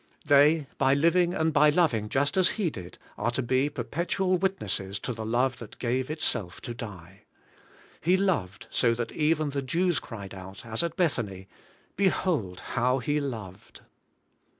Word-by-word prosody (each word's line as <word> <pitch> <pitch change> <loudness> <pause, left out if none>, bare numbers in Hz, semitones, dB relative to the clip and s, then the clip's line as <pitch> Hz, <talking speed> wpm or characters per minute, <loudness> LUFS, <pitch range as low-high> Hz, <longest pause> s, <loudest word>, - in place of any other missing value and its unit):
They, 145 +1 +5
iy 135 +1 +4
living 175 +3 +3
and 160 0 +1
iy 150 0 +6
loving 115 -12 +2
just 145 +4 +1
as 185 -1 +4
He 190 -7 0
did^ 90 -6 -9 0.2
are - - +1
to 125 +2 -1
be 130 +4 +2
perpetual 170 - -1
witnesses 180 - -1
to 125 - -4
the 110 -1 -5
love 125 +2 +1
that 115 - -10
gave 125 +2 -1
itself 105 - -2
to 120 - -5
die. 100 -3 -10 0.8
He 180 +3 +3
loved 155 - -1
so 115 -2 +3
that 115 -1 -3
even 155 -1 +1
the 140 0 -2
Jews 170 +6 +1
cried 100 -4 -9
out, 95 +3 -10
as 115 -1 -1
at 170 -1 -2
Bethany, 105 - -1 0.3
* - - -34
Behold 170 - 0
how 125 +1 +2
He 145 +4 0
loved!' 110 -9 -7
130 Hz, 165 wpm, -27 LUFS, 110-160 Hz, 0.8 s, iy